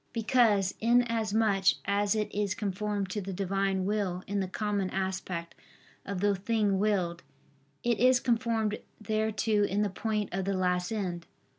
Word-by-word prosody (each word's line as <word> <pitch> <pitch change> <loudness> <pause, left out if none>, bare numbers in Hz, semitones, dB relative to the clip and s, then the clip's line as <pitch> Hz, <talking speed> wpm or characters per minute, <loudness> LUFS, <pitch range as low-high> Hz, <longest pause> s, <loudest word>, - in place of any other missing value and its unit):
Because 220 -4 +3
inasmuch 225 -4 +2 0.2
as 200 +1 +1
it 215 -1 -2
is 200 -2 0
conformed 205 -1 -2
to 210 - -2
the 195 0 -5
Divine 195 0 0
will 195 -3 -1
in 200 +1 -2
the 190 - -1
common 200 0 -1
aspect 190 -3 -3 0.5
of 195 -2 -3
the 205 0 +3
thing 205 0 +1
willed, 185 -5 0 0.6
it 235 -2 +1
is 250 +1 +5
conformed 225 -3 0 0.2
thereto 215 0 +1
in 205 +1 +1
the 205 - -1
point 210 0 -2
of 190 0 -1
the 195 0 0
last 180 0 0
end. 180 -6 -3
205 Hz, 150 wpm, -29 LUFS, 190-215 Hz, 0.6 s, is